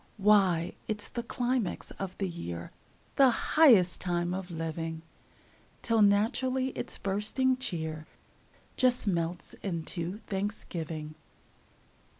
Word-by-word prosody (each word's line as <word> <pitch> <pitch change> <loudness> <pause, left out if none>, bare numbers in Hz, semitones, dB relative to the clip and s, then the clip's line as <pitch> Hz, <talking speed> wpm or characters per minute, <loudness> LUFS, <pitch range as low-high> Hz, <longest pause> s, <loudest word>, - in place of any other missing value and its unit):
Why, 195 -5 +4
it's 210 -1 -2
the 240 - -3
climax 240 -3 -2
of 190 -1 -5
the 195 - -1
year, 85 - -6 0.5
The 270 -2 +7
highest 235 - +5
time 175 -1 0
of 190 0 -4
living! 165 -1 -4 0.8
Till 230 -2 +3
naturally 255 +6 +2
its - - -5
bursting 210 +7 +1
cheer 160 -9 -3 0.7
Just 250 -2 +3
melts 170 -2 -2
into 170 0 -3
Thanksgiving. 170 -6 -4
190 Hz, 105 wpm, -30 LUFS, 170-225 Hz, 0.8 s, The